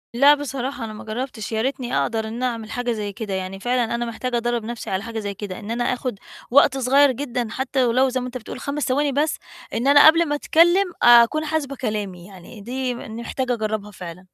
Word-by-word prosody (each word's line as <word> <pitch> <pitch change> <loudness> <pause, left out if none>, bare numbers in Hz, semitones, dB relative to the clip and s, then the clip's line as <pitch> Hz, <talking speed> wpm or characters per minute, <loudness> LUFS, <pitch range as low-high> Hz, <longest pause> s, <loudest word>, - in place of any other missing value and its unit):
لأ، 280 +4 +7
بصراحة، 270 -3 -4
أنا 215 - -7
ما 215 - -9
جرّبتش 225 -1 -5
يا 220 - 0
ريتني 255 0 -2
أقدر 220 -1 -1
إن 235 +3 -5
أعمِل 230 -3 -3
حاجة 245 -1 -2
زي 205 -3 -3
كده، 210 -1 -5
يعني 190 0 -4
فعلًا 245 +1 0
أنا 240 0 -2
محتاجة 240 +1 -3
أدرّب 240 -1 -1
نَفْسي 235 0 -6
على 190 +2 -2
حاجة 230 -1 -5
زي 205 -1 -4
كده، 200 -2 -7
إن 215 +1 -7
أنا 240 +1 -1
آخد 245 -4 -2 0.3
وقت 270 0 +5
صغيّر 270 +2 +4
جدًا 245 -2 -3
حتى 265 +2 -1
ولو 255 +3 +3
زي 255 0 -1
ما 250 - -4
أنت 250 0 -5
بتقُول 240 +2 -9
5 285 +1 -3
ثواني 285 +2 +1
بس. 295 +3 0 0.4
إن 245 +4 -1
أنا 285 +1 +8
قبل 330 +2 +6
ما 295 - 0
أتكلم 345 +5 +3
أكون 240 +6 +6
حاسبة 300 -3 -2
كلامي 205 -8 -4
يعني، 195 +3 -13
دي 250 +3 -3
م - - -8
إني 225 +1 -7
محتاجة 255 +1 -2
أجرّبها 215 -2 -3
فعلًا. 180 -2 -9
240 Hz, 220 wpm, -22 LUFS, 220-265 Hz, 0.4 s, أنا